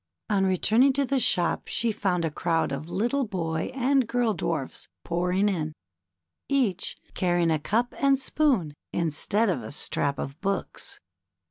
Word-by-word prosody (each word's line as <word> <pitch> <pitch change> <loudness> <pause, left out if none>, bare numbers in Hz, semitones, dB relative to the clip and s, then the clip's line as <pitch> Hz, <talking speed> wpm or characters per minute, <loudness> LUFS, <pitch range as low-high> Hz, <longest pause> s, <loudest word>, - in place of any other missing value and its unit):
On 195 -2 +3
returning 220 +8 +4
to 280 +1 +1
the 270 +1 +1
shop 175 -7 +2
she 230 -1 0
found 180 -5 0
a 160 - -1
crowd 165 -1 0
of 140 +4 -5
little 240 +9 0
boy 165 -6 -2
and 265 -1 +2
girl 235 -2 +1
dwarfs 155 -6 -3 0.2
pouring 180 +4 +1
in, 160 -6 -1 0.8
each 250 -10 +1 0.2
carrying 175 -2 +2
a 155 - +2
cup 230 +10 0
and 275 -1 +4
spoon 260 - +1 0.2
instead 175 +7 +1
of 170 -10 0
a 110 - -7
strap 140 -1 0
of 140 +4 -6
books. 195 -1 -3
190 Hz, 150 wpm, -26 LUFS, 165-240 Hz, 0.8 s, returning